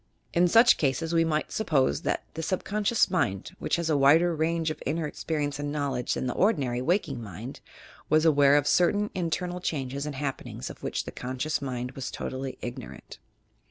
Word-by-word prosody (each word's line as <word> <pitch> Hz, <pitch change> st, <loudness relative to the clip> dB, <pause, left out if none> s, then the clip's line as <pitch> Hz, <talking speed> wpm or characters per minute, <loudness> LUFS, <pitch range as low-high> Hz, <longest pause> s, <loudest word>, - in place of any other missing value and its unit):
In 175 Hz, +1 st, +4 dB
such 230 Hz, +7 st, +6 dB
cases 155 Hz, +4 st, 0 dB
we 165 Hz, 0 st, +4 dB
might 155 Hz, -1 st, -1 dB
suppose 150 Hz, -11 st, +1 dB
that -, -, -1 dB
the 160 Hz, -, -4 dB
subconscious 205 Hz, +6 st, +1 dB
mind, 120 Hz, -, -1 dB
which -, -, 0 dB
has 170 Hz, -1 st, -2 dB
a 155 Hz, -, +2 dB
wider 160 Hz, +5 st, +5 dB
range 160 Hz, 0 st, 0 dB
of -, -, -8 dB
inner 160 Hz, +3 st, -1 dB
experience 145 Hz, -1 st, -3 dB
and 145 Hz, 0 st, -3 dB
knowledge 140 Hz, -4 st, -1 dB
than -, -, -2 dB
the 125 Hz, -, -1 dB
ordinary 135 Hz, -, +1 dB
waking 150 Hz, -, 0 dB
mind, 110 Hz, +5 st, -8 dB, 0.5 s
was 155 Hz, +1 st, +4 dB
aware 145 Hz, -3 st, +5 dB
of 145 Hz, -1 st, +3 dB
certain 205 Hz, +7 st, +2 dB
internal 180 Hz, 0 st, -2 dB
changes 140 Hz, -4 st, -3 dB
and 145 Hz, -, -5 dB
happenings 135 Hz, 0 st, -5 dB
of -, -, -14 dB
which -, -, -2 dB
the -, -, -7 dB
conscious 130 Hz, +5 st, -3 dB
mind 125 Hz, -2 st, -4 dB
was 135 Hz, -1 st, -5 dB
totally 130 Hz, 0 st, -5 dB
ignorant. 120 Hz, 0 st, -8 dB
150 Hz, 180 wpm, -27 LUFS, 135-170 Hz, 0.5 s, such